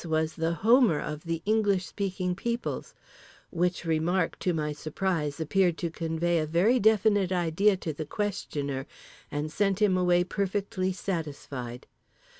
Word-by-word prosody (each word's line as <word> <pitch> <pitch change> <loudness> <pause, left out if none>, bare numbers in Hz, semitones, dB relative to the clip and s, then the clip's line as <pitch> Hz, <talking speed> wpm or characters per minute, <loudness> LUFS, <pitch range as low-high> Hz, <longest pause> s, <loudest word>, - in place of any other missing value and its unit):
was 160 -1 0
the 165 +1 -1
Homer 230 - +5
of 150 +2 -5
the 165 -1 -3
English 205 -3 +2
speaking 185 -2 -2
peoples—which 180 -5 -4
remark, 165 +2 0
to 180 - +1
my 155 -2 -1
surprise, 155 -1 -2
appeared 175 +1 +2
to 170 -2 -3
convey 165 +1 0
a 155 - -1
very 190 +11 +3
definite 205 -3 +3
idea 185 +3 +2
to 160 -3 -4
the 155 - -4
questioner 145 -9 -3 0.4
and 150 +1 -3
sent 195 +3 +1
him 205 -3 +4
away 180 -1 +3
perfectly 195 0 -1
satisfied. 145 -9 -5
175 Hz, 135 wpm, -28 LUFS, 160-195 Hz, 0.4 s, Homer